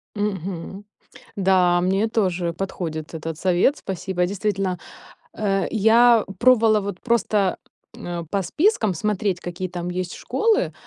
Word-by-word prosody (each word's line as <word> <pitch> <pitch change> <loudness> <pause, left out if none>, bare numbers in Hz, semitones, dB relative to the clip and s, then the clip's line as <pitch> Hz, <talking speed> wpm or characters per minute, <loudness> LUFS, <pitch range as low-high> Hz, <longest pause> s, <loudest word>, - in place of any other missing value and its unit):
Мгм. 195 -1 -4 0.5
Да, 185 -2 +3
мне 195 +5 +1
тоже 185 -6 0
подходит 165 -4 -5
этот 160 0 -5
совет, 185 - +2
спасибо. 185 -1 -2
Действительно, 195 -1 -2 0.6
э, 195 -3 0
я 225 +1 +5
пробовала 225 -4 +5
вот 200 -2 -5
просто, 210 -5 +1 0.4
м, - - -9
а, 175 -1 -4
по 200 -1 0
спискам 230 - +1
смотреть, 200 0 -1
какие 175 +1 -5
там 175 -1 -5
есть 180 0 -4
школы, 450 -1 0
190 Hz, 125 wpm, -22 LUFS, 175-215 Hz, 0.6 s, я